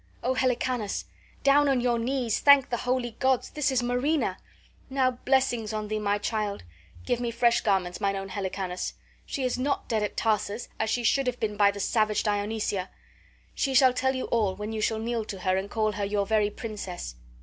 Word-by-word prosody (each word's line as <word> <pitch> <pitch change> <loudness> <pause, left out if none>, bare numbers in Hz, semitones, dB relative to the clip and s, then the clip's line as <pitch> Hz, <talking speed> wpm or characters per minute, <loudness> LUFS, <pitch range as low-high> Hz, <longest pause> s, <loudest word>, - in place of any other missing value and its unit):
O 255 - +1
Helicanus, 250 -4 0 0.4
down 280 +1 +5
on 270 -2 +3
your 240 -1 +1
knees, 245 -2 0
thank 280 -3 +6
the 240 - +1
holy 250 0 -1
gods! 260 -1 +1
This 300 -1 0
is 255 -2 +1
Marina. 250 +6 0 0.5
Now 260 -1 +2
blessings 245 -3 0
on 215 -1 -3
thee, 215 0 -1
my 205 -1 +1
child! 210 -1 -2 0.4
Give 235 - 0
me 240 -1 -1
fresh 235 0 +3
garments, 190 -2 0
mine 200 -1 +1
own 195 0 -5
Helicanus! 185 -1 -3 0.3
She 275 - -3
is 250 0 -1
not 275 +2 -1
dead 220 -2 0
at 210 - -3
Tarsus 215 0 0
as 220 - 0
she 240 +2 0
should 270 +3 +2
have 250 0 -1
been 210 -1 -1
by 205 0 +5
the 200 0 -4
savage 215 +1 +1
Dionysia. 205 -2 -1 0.6
She 270 -2 -1
shall 255 0 +6
tell 265 +1 +1
you 260 - -2
all, 210 -5 +2
when 210 +1 -5
you 215 - -2
shall 220 +1 +1
kneel 230 0 -2
to 195 -3 -7
her 185 0 +1
and 190 +1 -2
call 215 -1 0
her 205 0 -4
your 200 0 0
very 210 0 +2
Princess. 205 - -6
225 Hz, 200 wpm, -27 LUFS, 205-255 Hz, 0.6 s, thank